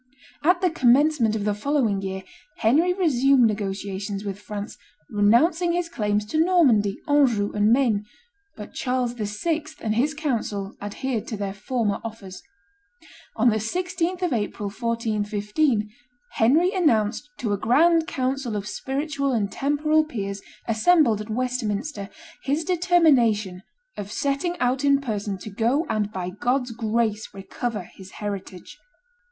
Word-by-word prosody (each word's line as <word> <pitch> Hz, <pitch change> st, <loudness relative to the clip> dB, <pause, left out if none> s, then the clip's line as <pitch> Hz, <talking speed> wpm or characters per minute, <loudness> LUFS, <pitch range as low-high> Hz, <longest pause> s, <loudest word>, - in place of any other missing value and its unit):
At 355 Hz, +3 st, +3 dB
the 365 Hz, -2 st, +2 dB
commencement 260 Hz, -4 st, +3 dB
of 210 Hz, -2 st, -2 dB
the 210 Hz, -, +1 dB
following 220 Hz, -3 st, 0 dB
year, 190 Hz, 0 st, -4 dB, 0.3 s
Henry 305 Hz, +11 st, +3 dB
resumed 275 Hz, -8 st, +3 dB
negotiations 200 Hz, -1 st, -3 dB
with 200 Hz, 0 st, -4 dB
France, 205 Hz, 0 st, -6 dB, 0.4 s
renouncing 315 Hz, -, +3 dB
his 350 Hz, -1 st, -1 dB
claims 210 Hz, -7 st, -1 dB
to 310 Hz, +9 st, +2 dB
Normandy, 255 Hz, -, +3 dB
Anjou, 255 Hz, -9 st, +3 dB
and 210 Hz, +1 st, +2 dB
Maine; 230 Hz, -5 st, +2 dB, 0.5 s
but 210 Hz, -1 st, -9 dB
Charles 250 Hz, -2 st, -1 dB
VI. 245 Hz, +9 st, -2 dB, 0.2 s
and 215 Hz, -, -1 dB
his 280 Hz, +7 st, +1 dB
council 220 Hz, -9 st, -2 dB
adhered 225 Hz, +3 st, -3 dB
to 220 Hz, -, -4 dB
their 200 Hz, -1 st, -3 dB
former 210 Hz, 0 st, -2 dB
offers. 210 Hz, -4 st, -8 dB, 0.9 s
On 235 Hz, +1 st, +4 dB
the 215 Hz, -, +1 dB
16th 360 Hz, -, -2 dB
of 350 Hz, -6 st, +1 dB
April, 205 Hz, -2 st, -2 dB
1415, 215 Hz, +1 st, 0 dB, 0.4 s
Henry 315 Hz, -, +3 dB
announced 245 Hz, -, +1 dB
to 220 Hz, -4 st, -1 dB
a -, -, 0 dB
grand 320 Hz, +9 st, +4 dB
council 260 Hz, -3 st, -2 dB
of 205 Hz, 0 st, -3 dB
spiritual 280 Hz, +2 st, -2 dB
and 205 Hz, -4 st, 0 dB
temporal 300 Hz, +5 st, +2 dB
peers, 200 Hz, -9 st, -5 dB, 0.3 s
assembled 230 Hz, -, +3 dB
at 215 Hz, -, -9 dB
Westminster, 230 Hz, -1 st, -2 dB, 0.3 s
his 285 Hz, +4 st, 0 dB
determination 285 Hz, -, +3 dB, 0.3 s
"of 205 Hz, 0 st, -6 dB
setting 285 Hz, +8 st, -1 dB
out 255 Hz, +2 st, +1 dB
in 280 Hz, -1 st, +4 dB
person 210 Hz, -6 st, -3 dB
to 210 Hz, +3 st, -9 dB
go 240 Hz, -, +1 dB
and, 210 Hz, -1 st, -1 dB
by 185 Hz, -2 st, -4 dB
God's 245 Hz, +5 st, -1 dB
grace, 225 Hz, -1 st, -1 dB
recover 210 Hz, +2 st, -4 dB
his 190 Hz, +2 st, -14 dB
heritage." 200 Hz, -3 st, -7 dB
230 Hz, 135 wpm, -24 LUFS, 205-290 Hz, 0.9 s, On